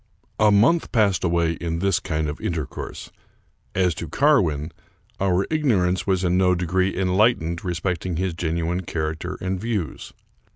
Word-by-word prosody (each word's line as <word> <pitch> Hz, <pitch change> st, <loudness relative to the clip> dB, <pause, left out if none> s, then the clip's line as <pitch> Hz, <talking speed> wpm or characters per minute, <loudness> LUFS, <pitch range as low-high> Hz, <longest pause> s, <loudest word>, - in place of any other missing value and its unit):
A 110 Hz, -, +5 dB
month 115 Hz, +12 st, +3 dB
passed 105 Hz, -6 st, +2 dB
away 85 Hz, -2 st, +2 dB
in 85 Hz, 0 st, -3 dB
this 95 Hz, 0 st, +1 dB
kind 80 Hz, -3 st, -2 dB
of 75 Hz, -, -5 dB
intercourse. 80 Hz, -6 st, -5 dB, 0.6 s
As 90 Hz, -2 st, +2 dB
to 85 Hz, -, -6 dB
Carwin, 85 Hz, -, +2 dB, 0.5 s
our 95 Hz, 0 st, +2 dB
ignorance 105 Hz, -, +1 dB
was 95 Hz, -1 st, +1 dB
in 90 Hz, 0 st, +2 dB
no 90 Hz, -1 st, +4 dB
degree 95 Hz, +2 st, 0 dB
enlightened 90 Hz, -3 st, +1 dB
respect 90 Hz, -1 st, -2 dB
ing 90 Hz, -, -2 dB
his 95 Hz, 0 st, -1 dB
genuine 85 Hz, +2 st, -2 dB
character 80 Hz, -2 st, -4 dB
and 95 Hz, 0 st, -2 dB
views. 105 Hz, -, -3 dB
90 Hz, 150 wpm, -23 LUFS, 85-95 Hz, 0.6 s, A